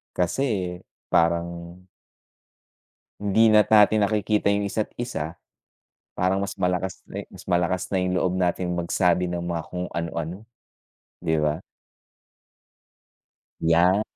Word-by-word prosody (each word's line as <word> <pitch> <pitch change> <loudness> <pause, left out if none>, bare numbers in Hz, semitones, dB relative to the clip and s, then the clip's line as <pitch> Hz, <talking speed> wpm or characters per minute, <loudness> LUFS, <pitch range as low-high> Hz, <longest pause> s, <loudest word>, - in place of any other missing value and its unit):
Kasi 90 +10 0 0.7
parang 85 +1 0 1.4
hindi 110 +2 +4
na't 105 -1 +5
natin 105 0 +6
nakikita 105 0 0
yung 100 - 0
isa't 110 +1 -2
isa. 80 -9 -4 0.8
Parang 95 +2 +1
mas 100 - -3
malakas 90 0 -1
na, - - -6
eh - - -15
mas - - -12
malakas 90 +1 +1
na 95 - +1
yung 90 0 0
loob 90 - +1
natin 90 0 0
magsabi 90 +1 +1
ng 85 -1 -3
mga 85 -2 -2
kung 90 0 -4
anu-ano, 85 +4 -4 0.7
'di 80 -2 0
ba? 75 +3 0 2.0
Yan. 85 +5 +4
90 Hz, 120 wpm, -24 LUFS, 85-100 Hz, 2.0 s, natin